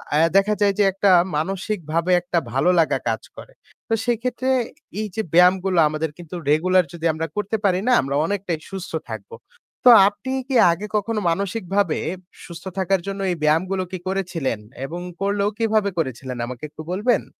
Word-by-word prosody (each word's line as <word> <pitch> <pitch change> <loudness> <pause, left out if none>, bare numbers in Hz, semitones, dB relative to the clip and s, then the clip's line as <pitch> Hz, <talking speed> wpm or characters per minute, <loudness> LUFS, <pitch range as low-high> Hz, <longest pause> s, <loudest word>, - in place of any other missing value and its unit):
এ্যা 165 +2 +4
দেখা 205 +2 +3
যায় 200 -1 +4
যে - - +6
একটা 195 0 +3 0.3
মানসিকভাবে 180 -1 -2
একটা 175 -1 -2
ভালো 135 +8 +2
লাগা 160 - +2
কাজ - - -2 0.2
করে। - - -11 0.3
তো 225 - -1
সেক্ষেত্রে 245 +2 -1 0.5
এই 215 - -2
যে, 220 - 0
ব্যায়ামগুলো 180 +1 +4
আমাদের 155 +1 -2
কিন্তু 175 0 -9 0.2
regular 185 +4 +4
যদি 170 -1 -6
আমরা 160 +1 -3
করতে 210 +2 -1
পারি 185 -1 +3
না, - - +4
আমরা 135 +1 -3
অনেকটাই 185 -4 -2
সুস্থ 190 -1 -6 0.2
থাকবো। 465 - -7 0.5
তো - - +10 0.2
আপনি 255 +6 -4 0.2
কি 265 - -2 0.2
আগে 185 +5 -3
কখনো 215 +1 -1
মানসিকভাবে 195 -1 -1 0.5
সুস্থ 170 +1 -10
থাকার 190 -1 +1
জন্য 195 0 -4
এই - - -1
ব্যায়ামগুলো 185 +5 +1
কি 185 - -3
করেছিলেন 175 - -2 0.3
এবং 170 +4 -6 0.2
করলেও 200 +1 +1
কিভাবে 215 -3 +1
করেছিলেন 130 -4 -3
আমাকে 125 +2 -8
একটু 155 - -10
বলবেন? 215 +4 +1
185 Hz, 165 wpm, -22 LUFS, 165-205 Hz, 0.5 s, তো